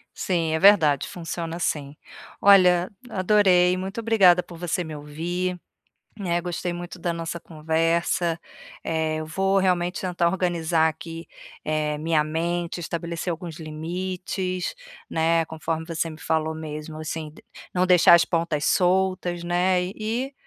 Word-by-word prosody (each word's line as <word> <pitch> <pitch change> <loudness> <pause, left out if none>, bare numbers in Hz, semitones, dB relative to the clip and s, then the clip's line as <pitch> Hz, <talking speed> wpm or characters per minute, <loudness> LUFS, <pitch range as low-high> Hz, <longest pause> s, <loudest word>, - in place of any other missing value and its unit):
Sim, 170 -4 -1
é 160 - +1
verdade, 160 -8 +5
funciona 165 -1 -5
sim. 145 -4 -2 0.4
Olha, 180 -3 +6 0.2
adorei, 185 -3 +4
muito 190 +4 -5
obrigada 195 -6 +5
por 170 - -12
você 175 +1 -1
me 160 -2 -7
ouvir, 175 +5 -3 0.6
né. 175 -4 0
Gostei 175 0 -3
muito 175 +1 -7
da 175 0 -1
nossa 165 0 -4
conversa, 165 +2 0 0.4
eh, 160 -1 -1
eu 155 - -5
vou 195 +4 +1
realmente 180 -2 +1
tentar 175 -2 +1
organizar 170 -3 +1
aqui, 165 +1 -7 0.4
eh, 155 -1 -1
minha 155 -1 +1
mente, 170 +2 -2
estabelecer 170 +1 -4
alguns 170 0 -6
limites, 180 - -4 0.3
né. 165 +1 +2
Conforme 160 0 -4
você 165 0 -2
me 155 - -10
falou 160 0 0
mesmo, 155 0 -7
assim, 155 0 -5
d 155 - -16 0.3
não 180 0 +2
deixar 180 -1 +7
as 170 - +6
pontas 165 -3 -1
soltas, 180 -1 +1
né, 180 +1 +2
e 235 +5 -3
170 Hz, 140 wpm, -24 LUFS, 160-180 Hz, 0.6 s, deixar